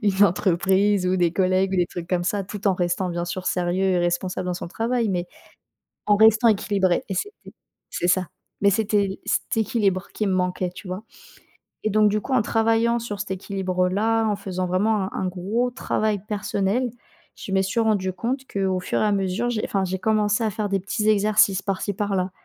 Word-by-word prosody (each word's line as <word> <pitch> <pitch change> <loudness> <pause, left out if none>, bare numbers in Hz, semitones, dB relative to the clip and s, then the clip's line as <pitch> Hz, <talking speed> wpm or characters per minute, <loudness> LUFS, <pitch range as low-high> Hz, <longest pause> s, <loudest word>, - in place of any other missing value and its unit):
une 200 -1 +4
entreprise 190 +1 +2
ou 185 +1 +2
des 175 -2 +2
collègues 185 +1 +1
ou - - 0
des 175 -1 +2
trucs 175 -1 -7
comme 175 -1 0
ça, 200 +2 -1
tout 205 +1 -6
en 190 - +3
restant 175 +1 -1
bien 175 0 -2
sûr 180 +1 -5
sérieux 180 +1 0
et 185 -2 +2
responsable 175 +1 -1
dans 180 - -1
son 175 - -6
travail 230 +4 -1
mais 180 -2 -1 0.8
en 205 - +4
restant 220 +2 +6
équilibrée 200 -4 +1
et 195 - -3
c'était 415 - -6 0.4
c'est 175 - -2
ça 185 0 +2 0.3
mais 200 - +4
c'était 200 -2 0
cet - - -1
équilibre 200 -4 0
qui 215 - -1
me 195 - +1
manquait, 180 0 -1
tu - - -11
vois 185 +3 -5 0.8
et - - +3
donc, 215 0 +4
du 210 +1 0
coup, 270 - -7
en 255 -2 +4
travaillant 225 +2 +2
sur 210 -4 -5
cet 205 -2 -4
équilibre-là, 190 +3 0
en 210 -2 0
faisant 185 -2 -3
vraiment 200 +3 +1
un 190 - -3
un 190 - -1
gros 200 +7 -1
travail 215 -3 -1
personnel, 210 +3 0 0.5
je - - -8
me 190 0 +3
suis 190 +4 0
rendu 200 -4 +1
compte 255 +7 -3
qu'au 190 -2 0
fur 180 - -1
et - - +3
à 210 - +2
mesure, 195 +4 0
j'ai 225 -3 -2
enfin, 195 -1 -1
j'ai 190 0 -2
commencé 210 +2 +1
à - - +1
faire 210 0 -3
des 195 0 +1
petits 210 +3 -1
exercices 205 -2 +3
par 195 -2 -2
ci, 205 - -2
par 200 0 -2
là, 185 0 -1
195 Hz, 210 wpm, -23 LUFS, 185-215 Hz, 0.8 s, restant